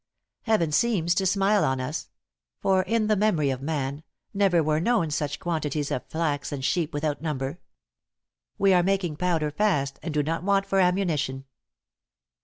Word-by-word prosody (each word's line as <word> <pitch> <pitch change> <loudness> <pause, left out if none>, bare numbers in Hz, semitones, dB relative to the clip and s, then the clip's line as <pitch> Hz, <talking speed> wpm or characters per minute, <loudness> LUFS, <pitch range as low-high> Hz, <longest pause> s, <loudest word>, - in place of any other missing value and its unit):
...."Heaven 215 -9 +2
seems 175 -3 +2
to 190 +1 +1
smile 200 +2 +3
on 130 0 0
us; 130 +6 -4 0.5
for 190 -1 +2
in 225 +3 0
the 215 0 +2
memory 180 -9 +2
of 130 -1 -4
man, 140 -1 -3 0.3
never 195 -5 +3
were 155 0 +1
known 190 -4 +1
such 145 0 -2
quantities 155 -4 -2
of 125 - -3
flax 155 -3 -2
and 135 -2 -4
sheep 165 0 0
without 145 -1 -2
number. 150 0 -3 1.0
We 195 -1 +4
are 180 - +5
making 180 -4 0
powder 165 -4 0
fast, 145 -7 0
and 165 - -4
do 150 -1 +1
not 165 +3 -2
want 195 +1 +2
for 195 - +1
ammunition." 170 -8 0
165 Hz, 165 wpm, -26 LUFS, 145-195 Hz, 1.0 s, are